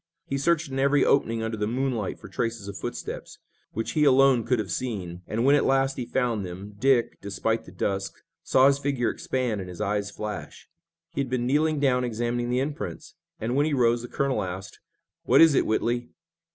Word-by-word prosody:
He 135 - -2
searched 155 -1 +1
in 135 - -2
every 140 +1 +3
opening 115 -5 +2
under 110 0 -3
the 105 0 -1
moonlight 120 -3 -1
for - - -11
traces 115 -4 -3
of 100 - -6
footsteps, - - -6 0.4
which 115 +2 -2
he 155 - +2
alone 135 -3 +5
could 125 +1 +2
have 105 -5 -3
seen, 90 -6 -4
and, 115 +3 -1
when 140 - +6
at 145 - +4
last 135 0 +2
he 125 -2 -4
found 120 -5 0
them, 95 +3 -8
Dick, 130 -1 +2
despite 110 +3 -1
the - - -12
dusk, 95 -1 -2 0.3
saw 130 0 +4
his 140 0 +4
figure 135 -4 0
expand 125 -6 -2
and 90 - -7
his 90 - -9
eyes 100 -1 -1
flash. 105 0 -7 0.5
He 140 - 0
had 135 - -3
been 125 -1 -1
kneeling 150 +3 +2
down 130 -3 +2
examining 120 +1 -1
the 125 +1 +1
imprints 145 +2 -5 0.3
and 115 +3 -2
when 145 +2 +3
he 150 - 0
arose 120 -2 +3
the 120 - -7
colonel 140 0 0
asked: 95 +1 -6 0.5
"What - - +5
is 165 -2 +8
it, - - +2
Whitley?" 120 +2 0
120 Hz, 205 wpm, -26 LUFS, 105-135 Hz, 0.5 s, is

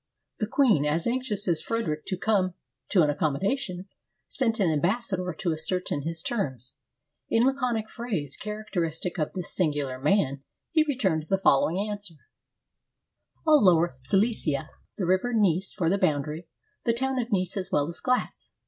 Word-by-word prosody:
The 215 - 0
queen, 225 - +3
as 150 +3 +1
anxious 235 -5 -1
as 170 -3 +1
Frederic 160 -10 -2
to 185 - -2
come 185 -3 +1 0.3
to 180 -5 +5
an 150 - +3
accommodation, 180 - -1 0.4
sent 230 -4 0
an 185 -5 +3
ambassador 185 +3 0
to 170 +1 -2
as 155 0 -2
certain 180 -5 -1
his 165 +2 -2
terms. 130 - -3 0.6
In 230 - +3
laconic 250 -5 0
phrase, 195 - -4
characteristic 180 -5 -3
of 155 - -1
this 180 -2 -5
singular 145 -7 0
man, 140 -3 +1 0.3
he 325 -2 +4
returned 190 - 0
the 195 - +3
following 165 -2 +3
answer: 205 -5 -5 0.7
— - - -45
"All 305 -5 +6
lower 170 -5 +4
Silesia; 155 - 0 0.3
the 190 - -1
river 190 +7 +1
Neiss 190 -3 +2
for 175 -5 -1
the 195 +4 +2
boundary. 155 -1 0 0.4
The 230 - +2
town 265 +2 -1
of 240 0 -3
Neiss 185 -3 0
as 190 -2 -3
well 145 0 +2
as 170 - -6
Glatz. 250 0 -1
185 Hz, 160 wpm, -27 LUFS, 160-220 Hz, 0.7 s, All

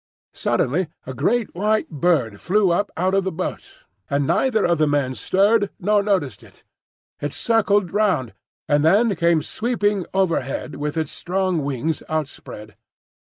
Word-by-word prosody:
Suddenly 165 +8 0 0.2
a 130 - -6
great 205 - 0
white 215 +4 0
bird 145 - 0
flew 195 0 +2
up 205 +4 +1
out 185 +3 +1
of 195 0 +2
the 190 - -2
boat, 180 +2 -6 0.3
and 140 0 +1
neither 220 - +2
of 170 -2 +1
the 155 - +3
men 145 -3 0
stirred 205 - +2
nor 205 +2 +2
noticed 170 - -1
it; - - -19 0.6
it 145 - -3
circled 205 -4 +1
round, 190 - +1 0.3
and 145 0 +2
then 200 +6 +4
came 170 -2 +2
sweeping 210 -5 -1
overhead 165 -7 -1
with 150 +2 -3
its 160 -3 -1
strong 185 -3 -1
wings 140 +3 -2
outspread. 140 -8 -5
175 Hz, 150 wpm, -22 LUFS, 145-205 Hz, 0.6 s, then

